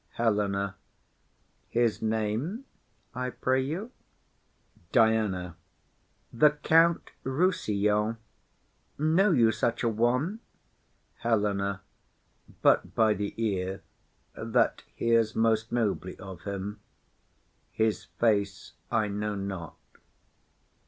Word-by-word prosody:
HELENA. 100 -3 0 0.9
His 120 -2 +1
name, 110 - -1 0.5
I 125 0 -2
pray 130 +1 0
you. 170 - -4 1.0
DIANA. 105 -7 +2 0.8
The 150 +6 +6
Count 165 +1 +4
Rossillon. 110 - +1 0.8
Know 160 +7 +3
you 120 -10 +4
such 115 +2 -1
a 115 - +3
one? 125 - +1 0.8
HELENA. 100 -3 0 0.8
But - - +3
by 110 -1 +4
the 100 0 -4
ear, 95 -3 -2 0.5
that - - +1
hears 115 -2 +2
most 110 0 +1
nobly 105 -6 -1
of 95 -2 -10
him; 100 +1 -4 0.9
His 110 -1 0
face 105 -4 0 0.2
I 110 -1 +1
know 105 +1 -2
not. 95 -4 -5
110 Hz, 90 wpm, -28 LUFS, 100-120 Hz, 1.0 s, The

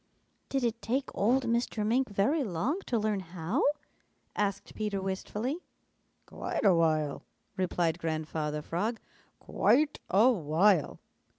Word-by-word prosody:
"Did 270 -2 0
it 235 -1 -1
take 260 +4 -2
old 250 +6 +2
Mr. 235 -2 0
Mink 250 +4 +2
very 210 +10 +1
long 230 - -1
to 240 - +1
learn 215 -2 0
how?" 180 - -2 0.7
asked 200 -1 -2
Peter 210 -2 -2
wistfully. 210 - -3 0.7
"Quite - - -4
a 195 - +7
while," 155 -3 +1 0.3
replied 175 -3 0
Grandfather 155 -2 -2
Frog. 210 +10 -2 0.4
"Quite 295 +3 +2
a 215 +7 +5
while. 170 - +2
200 Hz, 120 wpm, -30 LUFS, 165-235 Hz, 0.7 s, a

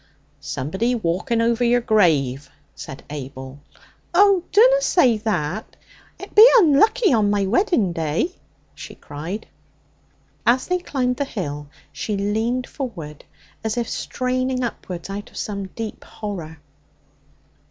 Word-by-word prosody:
'Somebody 190 - -2
walking 220 +4 -1
over 235 +1 +1
your 240 +1 +4
grave,' 150 - +2 0.2
said 135 - -9
Abel. 135 -1 -8 0.6
'Oh, 395 -1 +5
dunna - - +6
say 260 - +3
that! 210 -3 -3 0.4
It - - -10
be 425 - +9
unlucky 420 - +4
on 215 -3 +3
my 205 -1 +1
wedding 225 - +1
day,' 165 - -1 0.4
she - - -10
cried. 165 +9 -7 1.0
As 245 +2 +3
they 360 0 0
climbed 250 -7 -1
the 285 - 0
hill 150 - -5 0.2
she 200 +9 -3
leaned 220 +5 -1
forward, 170 - -7 0.4
as 220 +1 -2
if 235 -1 -1
straining 255 0 -2
upwards 180 -7 -5
out 200 +1 -6
of - - -14
some 200 -2 -4
deep 220 +3 -7
horror. 175 -7 -7
220 Hz, 125 wpm, -22 LUFS, 170-255 Hz, 1.0 s, be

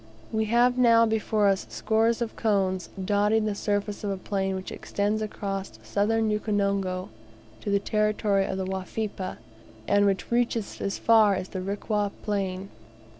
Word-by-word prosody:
We 220 0 0
have 240 +3 +3
now 230 -2 +6
before 220 -1 +1
us 195 -1 +1
scores 225 +2 +1
of 230 - -7
cones, 190 -5 0 0.2
dotting 210 +2 +2
the 210 - 0
surface 205 0 -2
of 205 - -1
a 195 - -2
plain 195 0 -2
which 190 0 -6
extends 205 +2 -1
across 195 -2 -4
Southern 220 +2 +1
Ukonongo 200 -3 -1 0.5
to - - -4
the 200 - +3
territory 210 -1 +1
of 190 - -3
the 190 - -2
Wafipa, 190 +1 -4 0.5
and 205 0 +4
which 195 +2 -1
reaches 235 -3 0
as 195 - -2
far 220 -3 +5
as 185 0 -4
the 185 - -4
Rikwa 205 +2 -1
Plain. 195 -2 -2
205 Hz, 155 wpm, -26 LUFS, 195-220 Hz, 0.5 s, now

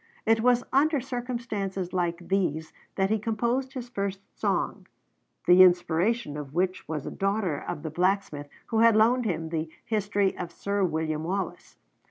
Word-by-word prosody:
It 225 0 +4
was 245 +1 +3
under 290 +2 +4
circumstances 235 -7 -4
like 175 -1 -1
these 160 -5 -1 0.2
that 195 +1 +1
he 220 - +2
composed 235 +5 -1
his 250 -3 -6
first 200 -4 -3 0.2
song, - - -1 0.6
the 180 +1 +7
inspiration 175 0 +3
of 145 0 -8
which 185 +1 -1
was 155 -3 -4
a - - -4
daughter 195 -6 -1
of 145 - -4
the 160 - -4
blacksmith 175 -4 0 0.2
who 225 - +1
had 230 -1 +6
loaned 235 +3 +4
him 165 -5 -2
the 160 -1 -2 0.2
'History 205 -2 0
of 175 -1 -5
Sir 200 +2 -1
William 160 -2 -1
Wallace.' 190 +2 -4
195 Hz, 160 wpm, -27 LUFS, 170-225 Hz, 0.6 s, the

